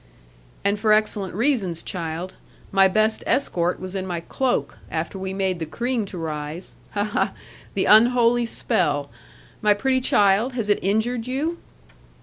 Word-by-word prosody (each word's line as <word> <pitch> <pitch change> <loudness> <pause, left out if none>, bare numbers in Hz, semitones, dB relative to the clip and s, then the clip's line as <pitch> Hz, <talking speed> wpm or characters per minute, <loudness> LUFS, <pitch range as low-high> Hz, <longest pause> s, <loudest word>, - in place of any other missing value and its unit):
'And 200 +1 +2
for 215 0 +2
excellent 210 -4 0
reasons, 210 - 0
child. 170 0 -4 0.4
My 195 0 +6
best 215 +3 +1
escort 180 -10 +1
was 185 0 -7
in 190 -1 -3
my 175 -2 -2
cloak, 255 +8 -1
after 165 +4 -3
we 190 0 -4
made 190 -2 -1
the 160 - -4
cream 235 +4 -2
to 185 - -8
rise. 155 +1 -5 0.2
Ha, 205 - +1
ha! 205 -2 0 0.4
The 195 - +1
unholy 235 +1 +5
spell. 145 -9 0 0.5
My 210 -1 +4
pretty 260 +4 +1
child, 210 +2 +3
has 225 -4 -1
it 205 - +2
injured 225 +4 0
you?' 300 +7 -2
200 Hz, 150 wpm, -23 LUFS, 180-230 Hz, 0.5 s, My